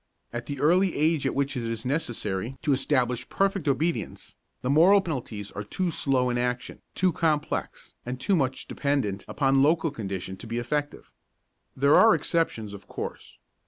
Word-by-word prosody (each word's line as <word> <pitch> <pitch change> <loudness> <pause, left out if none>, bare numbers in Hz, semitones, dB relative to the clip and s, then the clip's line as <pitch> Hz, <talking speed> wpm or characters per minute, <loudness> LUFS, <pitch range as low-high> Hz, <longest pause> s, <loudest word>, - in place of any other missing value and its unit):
At 120 0 -5
the 140 -2 -5
early 180 +5 +3
age 155 -2 +2
at - - -2
which 140 0 0
it 125 - -2
is 115 0 -4
necessary 120 - -2
to 150 -2 +3
establish 130 -2 0
perfect 195 -5 0
obedience, 160 +5 -1 0.3
the 125 - -1
moral 175 +7 +6
penalties 120 - -5
are - - -5
too 175 - -2
slow 130 -4 +1
in 120 - -1
action, 125 0 -3
too 185 -1 +2
complex 155 -3 -2
and 125 +1 -5
too 195 - +2
much 130 -5 -1
dependent 135 -9 -1
upon 135 -1 +2
local 160 +2 +3
condition 95 -5 -5
to 115 - -10
be 115 +1 -3
effective. 145 +4 -3 0.7
There 140 +2 +4
are 225 -1 +7
exceptions, 115 - -1
of 100 -1 -11
course. - - -7
135 Hz, 165 wpm, -26 LUFS, 120-160 Hz, 0.7 s, are